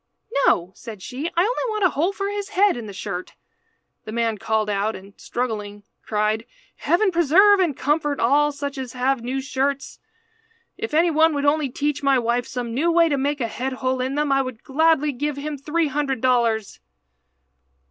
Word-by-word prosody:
"No," 175 Hz, +2 st, +2 dB
said 215 Hz, -4 st, -10 dB
she, 265 Hz, +5 st, -4 dB
"I -, -, +6 dB
only 485 Hz, +3 st, -1 dB
want 425 Hz, -2 st, -1 dB
a 370 Hz, -, +5 dB
hole 330 Hz, +7 st, 0 dB
for 395 Hz, 0 st, -3 dB
his 405 Hz, 0 st, -4 dB
head 410 Hz, 0 st, +3 dB
in 235 Hz, -3 st, -6 dB
the -, -, -7 dB
shirt." 195 Hz, -2 st, -6 dB, 0.7 s
The 215 Hz, -, -6 dB
man 225 Hz, -2 st, -1 dB
called 220 Hz, 0 st, 0 dB
out 210 Hz, +1 st, -1 dB
and, 195 Hz, +1 st, -12 dB
struggling, 210 Hz, -4 st, -4 dB, 0.2 s
cried 215 Hz, +2 st, -1 dB, 0.3 s
"Heaven 375 Hz, +3 st, +2 dB
preserve 360 Hz, +5 st, +5 dB
and 335 Hz, -8 st, +1 dB
comfort 295 Hz, 0 st, 0 dB
all 290 Hz, +5 st, +3 dB
such 285 Hz, -1 st, -5 dB
as 255 Hz, -3 st, -6 dB
have 255 Hz, 0 st, 0 dB
new 255 Hz, +3 st, -3 dB
shirts! 275 Hz, +1 st, -2 dB, 0.8 s
If 445 Hz, -9 st, -4 dB
any 335 Hz, +2 st, +4 dB
one 315 Hz, 0 st, +3 dB
would 285 Hz, 0 st, -1 dB
only 290 Hz, -1 st, +2 dB
teach 290 Hz, +3 st, -2 dB
my 275 Hz, -1 st, +3 dB
wife 240 Hz, 0 st, 0 dB
some 240 Hz, -2 st, -4 dB
new 320 Hz, +8 st, +1 dB
way 335 Hz, 0 st, +4 dB
to 285 Hz, -, +1 dB
make 285 Hz, +1 st, -1 dB
a 230 Hz, -, 0 dB
head 255 Hz, +4 st, -4 dB
hole 255 Hz, 0 st, -1 dB
in 260 Hz, +2 st, -2 dB
them 295 Hz, -1 st, 0 dB
I 275 Hz, 0 st, +4 dB
would 255 Hz, -4 st, -7 dB
gladly 300 Hz, +1 st, +2 dB
give 290 Hz, +2 st, -3 dB
him 295 Hz, +1 st, -4 dB
three 310 Hz, +4 st, -1 dB
hundred 275 Hz, -2 st, -1 dB
dollars." 235 Hz, -4 st, +1 dB
275 Hz, 190 wpm, -22 LUFS, 235-310 Hz, 0.8 s, I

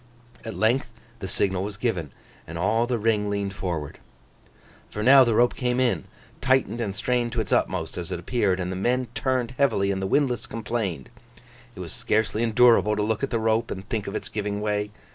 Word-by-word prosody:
At 110 Hz, -, -6 dB
length 120 Hz, +3 st, +1 dB, 0.3 s
the 95 Hz, -, -5 dB
signal 95 Hz, 0 st, 0 dB
was 100 Hz, +1 st, -4 dB
given, 95 Hz, -, -2 dB, 0.4 s
and 85 Hz, -, -6 dB
all 110 Hz, +7 st, +1 dB
the 125 Hz, -1 st, 0 dB
ring 105 Hz, -2 st, +1 dB
leaned 100 Hz, -1 st, -2 dB
forward. 85 Hz, -7 st, -4 dB, 0.9 s
For, 105 Hz, -, -4 dB
now, 135 Hz, +2 st, +8 dB
the 115 Hz, -3 st, +1 dB
rope 120 Hz, +2 st, +4 dB
came 125 Hz, 0 st, -1 dB
in, 130 Hz, -2 st, +1 dB, 0.4 s
tightened 130 Hz, -2 st, +2 dB
and 100 Hz, -4 st, -3 dB
strained 120 Hz, +1 st, 0 dB
to 120 Hz, -, -1 dB
its 110 Hz, -, -2 dB
utmost 90 Hz, -3 st, 0 dB
as 85 Hz, -, -6 dB
it -, -, -3 dB
appeared, 100 Hz, -2 st, 0 dB
and 90 Hz, 0 st, -2 dB
the -, -, -3 dB
men 125 Hz, +6 st, 0 dB
turned 130 Hz, -2 st, -1 dB
heavily, 110 Hz, -8 st, +2 dB
and 95 Hz, 0 st, -2 dB
the 95 Hz, -, -1 dB
windlass 125 Hz, +1 st, +1 dB
complained. 105 Hz, -, -3 dB, 0.7 s
It -, -, -7 dB
was -, -, -7 dB
scarcely 110 Hz, 0 st, 0 dB
endurable 115 Hz, -2 st, +4 dB
to 105 Hz, -, 0 dB
look 110 Hz, 0 st, -1 dB
at 135 Hz, -, -1 dB
the 115 Hz, -, 0 dB
rope, 110 Hz, +1 st, +1 dB
and 95 Hz, +1 st, -6 dB
think 110 Hz, -3 st, -2 dB
of 100 Hz, -, -4 dB
its -, -, -3 dB
giving 105 Hz, -1 st, -3 dB
way. 105 Hz, 0 st, -1 dB
110 Hz, 200 wpm, -25 LUFS, 100-120 Hz, 0.9 s, now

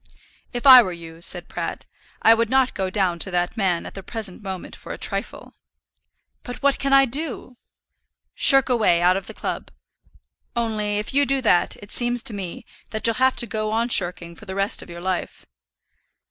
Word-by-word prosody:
"If 245 Hz, 0 st, -5 dB
I 260 Hz, -2 st, +10 dB
were 190 Hz, -6 st, -3 dB
you," 165 Hz, -1 st, -11 dB
said -, -, -1 dB
Pratt, -, -, -6 dB, 0.4 s
"I 225 Hz, -, +7 dB
would 230 Hz, -1 st, 0 dB
not 265 Hz, 0 st, +2 dB
go 190 Hz, -1 st, -3 dB
down 185 Hz, -3 st, -1 dB
to 190 Hz, -, -2 dB
that 175 Hz, +1 st, -2 dB
man 185 Hz, -6 st, -1 dB
at -, -, -9 dB
the 195 Hz, -, -8 dB
present 215 Hz, -2 st, -4 dB
moment 190 Hz, -3 st, -7 dB
for -, -, -11 dB
a -, -, -6 dB
trifle." -, -, -4 dB, 0.9 s
"But 245 Hz, +1 st, -9 dB
what 280 Hz, -1 st, +2 dB
can 275 Hz, -, -2 dB
I 275 Hz, 0 st, +6 dB
do?" 265 Hz, -1 st, -4 dB, 0.8 s
"Shirk 270 Hz, -2 st, +5 dB
away 220 Hz, -9 st, +2 dB
out 180 Hz, +1 st, +4 dB
of 195 Hz, -, -5 dB
the -, -, -9 dB
club. -, -, -5 dB, 0.9 s
Only 215 Hz, -3 st, -1 dB
if 210 Hz, +4 st, -4 dB
you 285 Hz, 0 st, +3 dB
do 270 Hz, +1 st, +2 dB
that 180 Hz, -6 st, +2 dB
it 205 Hz, -, -12 dB
seems 240 Hz, 0 st, +2 dB
to 225 Hz, -, +3 dB
me 190 Hz, -4 st, -7 dB, 0.2 s
that 220 Hz, -2 st, -6 dB
you'll 230 Hz, -, +3 dB
have 260 Hz, 0 st, +3 dB
to -, -, +2 dB
go 215 Hz, -2 st, -3 dB
on 230 Hz, +2 st, 0 dB
shirking 175 Hz, -4 st, +1 dB
for 215 Hz, -, -15 dB
the 190 Hz, -1 st, -7 dB
rest 195 Hz, +1 st, +1 dB
of -, -, -13 dB
your 170 Hz, 0 st, -9 dB
life." 185 Hz, 0 st, -4 dB
215 Hz, 200 wpm, -22 LUFS, 185-245 Hz, 0.9 s, I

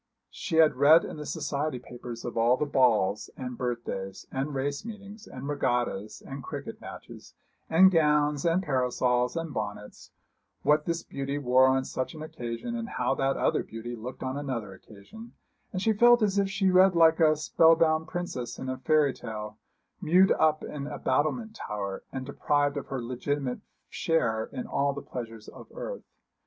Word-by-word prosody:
She 170 Hz, -, -4 dB
had 160 Hz, -5 st, +5 dB
read 155 Hz, +5 st, +6 dB
in -, -, -7 dB
the 150 Hz, -, -7 dB
society 145 Hz, -1 st, -2 dB
papers 120 Hz, -1 st, -9 dB
of 120 Hz, -, -5 dB
all 120 Hz, +2 st, +3 dB
the 150 Hz, -, 0 dB
balls, 120 Hz, -8 st, +2 dB
and 125 Hz, -1 st, -5 dB
birthdays, 115 Hz, -6 st, -4 dB
and 140 Hz, +2 st, -3 dB
race 140 Hz, +4 st, -2 dB
meetings, 210 Hz, -1 st, -10 dB
and 130 Hz, +2 st, -8 dB
regattas, 120 Hz, -7 st, -1 dB
and 135 Hz, 0 st, -7 dB
cricket -, -, -7 dB
matches, -, -, -11 dB, 0.3 s
and 190 Hz, +4 st, +7 dB
gowns, 150 Hz, -3 st, +2 dB
and 175 Hz, +2 st, +2 dB
parasols, 125 Hz, -3 st, +1 dB
and 165 Hz, -3 st, -4 dB
bonnets 105 Hz, 0 st, -6 dB, 0.5 s
what 150 Hz, 0 st, +3 dB
this 170 Hz, 0 st, -2 dB
beauty 140 Hz, +1 st, -4 dB
wore 130 Hz, -1 st, +4 dB
on 130 Hz, 0 st, +2 dB
such 130 Hz, +5 st, -4 dB
an 155 Hz, -, -7 dB
occasion, 120 Hz, -, -5 dB
and 230 Hz, 0 st, -4 dB
how -, -, 0 dB
that 135 Hz, 0 st, 0 dB
other -, -, +1 dB
beauty 115 Hz, +2 st, -7 dB
looked 120 Hz, +3 st, -7 dB
on 130 Hz, +2 st, -3 dB
another 120 Hz, -8 st, -4 dB
occasion 110 Hz, -, -13 dB, 0.4 s
and 185 Hz, -1 st, -3 dB
she 225 Hz, -, +3 dB
felt 240 Hz, +2 st, +6 dB
as 200 Hz, -1 st, +2 dB
she 195 Hz, -1 st, +1 dB
read 185 Hz, 0 st, +5 dB
like 165 Hz, 0 st, +5 dB
a 155 Hz, -2 st, +5 dB
spell 160 Hz, +2 st, +4 dB
bound 160 Hz, -1 st, +2 dB
princess 175 Hz, -9 st, -4 dB
in 130 Hz, -, -5 dB
a 130 Hz, 0 st, -4 dB
fairy 145 Hz, +1 st, +3 dB
tale, 105 Hz, -2 st, -7 dB, 0.4 s
mewed 185 Hz, +4 st, +5 dB
up 155 Hz, -1 st, +2 dB
in 145 Hz, -1 st, -5 dB
a -, -, -5 dB
battlemented 155 Hz, -, 0 dB
tower, 100 Hz, -, -5 dB
and 130 Hz, -1 st, -5 dB
deprived 145 Hz, +1 st, 0 dB
of 140 Hz, -, -5 dB
her 130 Hz, -3 st, -4 dB
legitimate 130 Hz, +2 st, -3 dB, 0.3 s
share 115 Hz, -9 st, 0 dB
in 125 Hz, -, -5 dB
all 140 Hz, 0 st, 0 dB
the 140 Hz, -, -7 dB
pleasures 115 Hz, -3 st, -7 dB
of -, -, -12 dB
earth. -, -, -5 dB
140 Hz, 175 wpm, -28 LUFS, 125-165 Hz, 0.5 s, and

